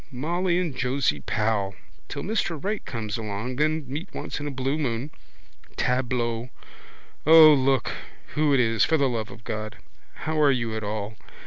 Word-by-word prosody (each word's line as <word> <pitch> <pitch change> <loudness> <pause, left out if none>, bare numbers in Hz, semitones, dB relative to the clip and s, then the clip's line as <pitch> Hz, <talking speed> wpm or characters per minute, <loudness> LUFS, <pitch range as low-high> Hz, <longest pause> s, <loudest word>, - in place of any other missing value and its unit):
Molly 170 +7 0
and 170 -7 -1
Josie 130 - 0
Powell. 105 +4 -1 0.3
Till - - -5
Mr 195 -5 -1
Right 210 +2 -2
comes 110 -2 -4
along, 110 +3 -4
then 155 +1 +1
meet 150 +8 -6
once - - -4
in 145 - -4
a - - -1
blue 135 +2 -1
moon. 130 0 -2 0.6
Tableau! 125 -2 0 0.8
O, 160 -1 +10
look 135 -1 +2 0.4
who 150 -1 +2
it 135 - +4
is 115 -3 +3
for 160 - +3
the 140 -2 +3
love 115 -4 -2
of 110 - -12
God! 110 -1 -4 0.5
How 155 0 0
are 145 - +6
you 120 -4 0
at 110 - -3
all? 105 +1 -4
130 Hz, 165 wpm, -25 LUFS, 115-155 Hz, 0.8 s, O